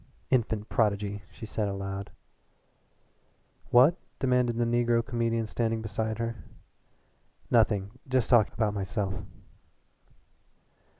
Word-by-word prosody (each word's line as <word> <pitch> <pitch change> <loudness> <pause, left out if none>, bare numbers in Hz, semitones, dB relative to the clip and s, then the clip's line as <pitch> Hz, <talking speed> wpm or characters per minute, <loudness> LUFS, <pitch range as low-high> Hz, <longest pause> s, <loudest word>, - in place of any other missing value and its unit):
"Infant 110 -4 +1
prodigy!" 100 -2 0
she 110 - -9
said 105 -1 -2
aloud. 100 0 -4 1.6
"What?" 135 +9 +6 0.2
demanded 125 -2 +1
the 120 - +2
negro 120 0 +2
comedian 115 -2 0
standing 115 0 -1
beside 110 +1 -2
her. 115 0 -3 1.1
"Nothing 105 -4 +3 0.2
just 130 -3 +2
talking 115 -4 +4
about 110 -3 +1
myself." 100 -1 -2
115 Hz, 100 wpm, -28 LUFS, 105-120 Hz, 1.6 s, What